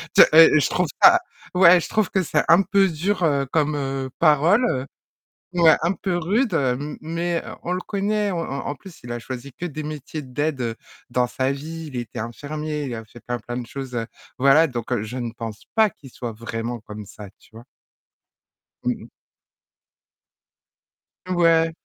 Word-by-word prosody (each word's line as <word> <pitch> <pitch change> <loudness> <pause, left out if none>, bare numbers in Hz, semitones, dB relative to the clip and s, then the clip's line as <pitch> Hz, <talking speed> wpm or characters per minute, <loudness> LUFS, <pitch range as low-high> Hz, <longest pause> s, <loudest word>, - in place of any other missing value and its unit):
te - - +9
je 155 -2 +7
trouve 180 -1 0 0.2
ça 355 0 +9 0.4
ouais, 180 -1 +7
je - - -5
trouve 215 -3 +1
que 190 - +2
c'est 150 -2 +1
un 170 +4 +7
peu 195 +1 +3
dur, 180 +4 -1
heu, 140 -4 +2
comme, 150 -1 +1
heu, 135 -2 -3
parole, 160 - +3 0.7
ouais, 170 -3 +6
un 170 +3 +2
peu 190 -2 -2
rude, 205 +6 0
m 140 0 -1
mais, 170 +1 -2
heu, - - -8
on 175 - -3
le 180 - -1
connaît, 205 +1 -1
en 180 - -2
en 140 -4 -4
en - - -3
plus, 190 0 -14
il 120 - -5
a 120 - -3
choisi 130 +3 -7
que 175 - -5
des 155 -2 -5
métiers 150 0 -6
d'aide 130 -3 -2 0.4
dans 125 0 +2
sa 130 +2 -1
vie, 160 +4 -7
il - - -6
était 120 -1 -5
infirmier, 150 +6 -4
il 125 - -4
a 110 - -7
fait 115 +2 -15
plein, 120 +1 -4
plein 120 +2 -6
de 120 - -6
choses, 135 0 -7
heu, 115 -1 -2 0.3
voilà 140 +5 +5
donc 120 -4 -5 0.2
je 110 +4 -6 0.2
pense 115 -3 -7
pas 220 -1 +4
qu'il 140 - -15
soit 120 -1 -6
vraiment 115 +1 -5
comme 105 -1 -9
ça, 105 +1 -11
tu - - -23
vois? 115 +2 -12 1.2
Mmh - - +1
mh. - - -12 2.2
Ouais. 165 -2 +3
150 Hz, 180 wpm, -23 LUFS, 125-170 Hz, 2.2 s, te